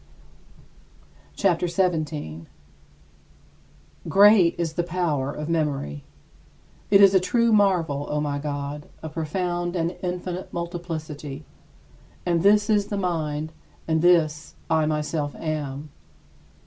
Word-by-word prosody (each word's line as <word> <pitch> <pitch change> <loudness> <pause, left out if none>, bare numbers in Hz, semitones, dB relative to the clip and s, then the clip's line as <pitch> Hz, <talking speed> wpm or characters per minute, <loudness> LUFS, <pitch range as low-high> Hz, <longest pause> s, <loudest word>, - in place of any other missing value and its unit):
CHAPTER 180 -3 +1
XVII 180 +2 +2 0.2
26. 85 - -8 1.6
Great 200 -3 +6
is 165 -2 -2
the 175 - 0
power 165 -6 -1
of 150 +1 -6
memory. 145 - -2 0.9
It 200 0 +6
is 195 -1 +7
a 190 - +6
true 230 +4 +2
marvel, 170 -9 +2
O 150 - -1
my 145 -1 -2
God, 145 0 -5
a 160 - -4
profound 175 +3 -2
and 170 +1 -1
infinite 180 0 -4
multiplicity! 160 -4 -6 0.8
And 170 -2 +1
this 205 +2 +4
is 205 -2 +2
the 205 - -3
mind, 155 -4 -2 0.3
and 160 -1 +1
this 155 -4 +2 0.2
I 160 -1 +3
myself 150 -1 -2
am. 150 -2 -4
165 Hz, 115 wpm, -24 LUFS, 150-180 Hz, 1.6 s, is